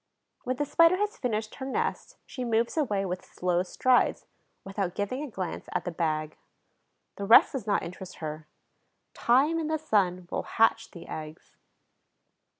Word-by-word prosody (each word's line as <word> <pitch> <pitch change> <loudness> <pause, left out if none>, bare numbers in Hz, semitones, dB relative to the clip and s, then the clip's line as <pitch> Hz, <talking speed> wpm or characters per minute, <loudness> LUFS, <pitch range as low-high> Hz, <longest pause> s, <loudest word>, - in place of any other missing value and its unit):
When 255 +1 0
the 290 - -1
Spider 335 +4 +5
has 415 +3 -1
finished 220 - -2
her 265 - -5
nest, 270 - -2
she 255 - -6
moves 230 0 +1
away 210 -11 0
with 180 0 -4
slow 180 -1 -1
strides, 250 +7 +2 0.4
without 195 -2 -3
giving 205 +7 -2
a 300 - -5
glance 185 -6 -5
at - - -1
the 175 - -2
bag. 155 -2 -2 0.8
The 200 - -3
rest 225 - +7
does 250 -6 -5
not 205 - +1
interest 180 +2 -8
her: 155 -1 -6 0.7
time 280 +7 +3
and 315 -1 -2
the 315 - +1
sun 190 - 0
will - - -1 0.2
hatch 225 0 +3
the 170 - -11
eggs. 155 0 -8
210 Hz, 160 wpm, -28 LUFS, 180-265 Hz, 0.8 s, rest